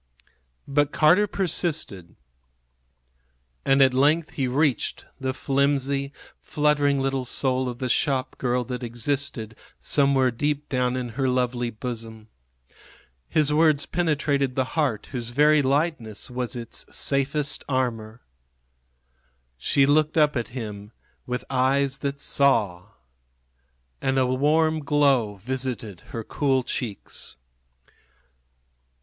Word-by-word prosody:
But 145 +1 +1
Carter 180 +7 +4
persisted. 160 - -1 1.5
And 135 0 +5
at 130 -1 +4
length 150 +5 +2
he 135 -2 -1
reached 135 -1 0
the 130 0 -1
flimsy, 140 0 0 0.3
fluttering 145 -2 +1
little 135 -1 -1
soul 130 0 0
of 120 - -6
the 130 - -4
shopgirl 130 -2 0
that 125 0 -4
existed 120 -1 -3 0.2
somewhere 140 -3 +2
deep 145 +4 -2
down 125 -1 0
in 125 -1 -3
her 130 +3 -1
lovely 125 -1 0
bosom. 110 -1 -7 1.0
His 150 -2 +2
words 155 -2 +3
penetrated 145 -6 0
the 130 - +2
heart 145 -10 -1
whose 120 -3 -4
very 150 +4 +4
lightness 135 -6 -1
was 125 0 -3
its 120 -2 -3
safest 140 +1 -1
armor. 120 -4 -2 1.3
She 135 - +2
looked 155 +2 +2
up 150 -2 +4
at 120 -3 -1
him 105 -3 -7 0.3
with 125 0 -3
eyes 135 +1 +1
that 140 0 -3
saw. 110 -13 +2 1.2
And 135 0 0
a 130 - +3
warm 155 +5 +2
glow 140 -8 +2
visited 125 -6 -4
her 115 - -5
cool 135 +1 0
cheeks. 110 - -5
135 Hz, 110 wpm, -24 LUFS, 125-145 Hz, 1.5 s, And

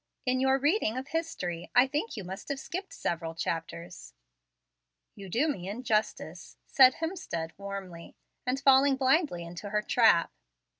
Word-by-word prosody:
In 255 0 +1
your 265 0 +3
reading 285 - +1
of 260 +1 -5
history, 180 - -3
I 245 - +7
think 295 - -3
you 205 - -5
must 190 +2 -8
have 280 -1 -2
skipped 375 +7 -6
several 165 -1 -3
chapters." 165 - -5 1.0
"You 195 -2 -10
do 250 - +1
me 190 - -3
injustice," 215 -1 -2
said 260 -2 +6
Hemstead, 320 - -4
warmly, 195 -4 -8 0.3
and 255 +2 -1
falling 275 0 +5
blindly 265 - +1
into 170 +4 -8
her 210 +1 0
trap. 220 -8 +4
230 Hz, 145 wpm, -29 LUFS, 175-270 Hz, 1.0 s, I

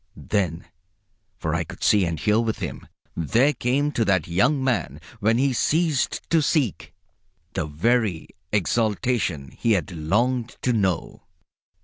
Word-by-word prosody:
Then 90 -5 -2 0.7
for 80 -4 -2
I 85 0 0
could - - -10
see 105 -3 +4
and 85 -2 -3
hear 105 +1 +2
with 115 -1 -1
him - - -6 0.3
there 120 - +2
came 135 +4 0
to 120 - 0
that 95 -5 +1
young 130 - +2
man 130 -2 -1 0.2
when 110 +3 +2
he 135 +1 +2
ceased 155 +1 0
to 165 -1 +4
seek, 145 - -1 0.6
the 85 -5 -2
very 100 +3 0 0.2
exaltation 105 - 0
he 115 - +1
had 85 -7 -1
longed 115 +10 0
to 125 - +2
know. 95 -7 -1
110 Hz, 140 wpm, -24 LUFS, 85-125 Hz, 0.7 s, see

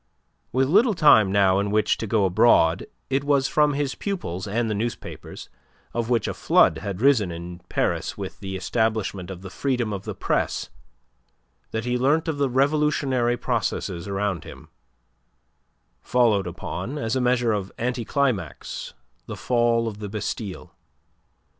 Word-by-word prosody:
With 130 +1 +2
little 210 - +4
time 110 - +6
now 95 -1 +4
in 100 0 -1
which 105 +1 +2
to 110 - -4
go 105 -1 +2
abroad 95 -3 +4 0.2
it 135 +1 +1
was 140 -2 +2
from 150 -1 +3
his 140 -1 -1
pupils 100 - -4
and 115 +3 0
the 110 - -1
newspapers 115 +3 -5 0.5
of 120 0 -2
which 120 -2 +1
a - - -2
flood 80 - +3
had 100 +2 -5
risen 125 -8 +4
in 85 +1 -7
Paris - - -1
with - - -6
the 95 -1 -5
establishment 105 -2 -1
of 95 -1 -8
the 95 - -8
freedom 125 -5 -1
of 95 - -5
the - - -5
Press - - -1 1.0
that 110 +1 -3
he 125 0 0
learnt 150 +6 +2
of 155 -3 -2
the 140 -2 +2
revolutionary 135 -3 +1
processes 100 -7 -2
around 100 -4 -2
him, - - -12 1.3
following 115 - +2
upon, 140 +5 -5
as 115 -5 -1
a 130 - +1
measure 125 -2 +2
of 100 -2 -3
anticlimax, 125 -1 -2 0.3
the - - -6
fall 120 -1 +1
of 105 -2 -6
the 105 -1 -5
Bastille. 105 -1 -5
115 Hz, 155 wpm, -24 LUFS, 100-130 Hz, 1.3 s, time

